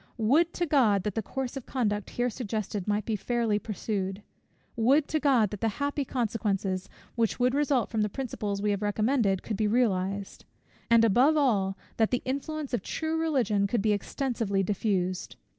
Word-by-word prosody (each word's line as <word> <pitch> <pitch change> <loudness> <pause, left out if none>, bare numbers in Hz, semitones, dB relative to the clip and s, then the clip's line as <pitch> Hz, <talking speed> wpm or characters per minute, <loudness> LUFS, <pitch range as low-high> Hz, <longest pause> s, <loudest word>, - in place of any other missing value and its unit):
Would 285 +10 +3
to 350 - 0
God 235 - +3
that 210 - -2
the 225 - -1
course 265 +4 -4
of 270 - -7
conduct 210 -6 -1
here 245 0 -1
suggested 215 -4 -4
might 210 0 0
be 220 - -1
fairly 225 0 0
pursued! 200 -1 -3 0.5
Would 270 +6 +3
to 310 - +1
God 255 -9 +3
that 210 - -6
the 225 - +2
happy 285 0 -1
consequences, 205 -6 -1 0.2
which 230 -1 0
would 250 +1 +3
result 280 -4 +1
from 220 - 0
the 210 - +1
principles 210 -5 -4
we 210 - +2
have 200 0 -1
recommended, 210 -1 +1
could 215 - -3
be 215 - +1
realized; 200 -4 0 0.5
and 230 -1 +6
above 255 +9 +4
all, 200 -9 +2 0.2
that 220 -1 +3
the 250 - -1
influence 280 +2 -3
of 240 - +1
true 320 0 -3
Religion 255 -11 +1
could 210 0 0
be 215 - +3
extensively 210 -2 -1
diffused! 185 -2 -1
225 Hz, 175 wpm, -28 LUFS, 205-260 Hz, 0.5 s, and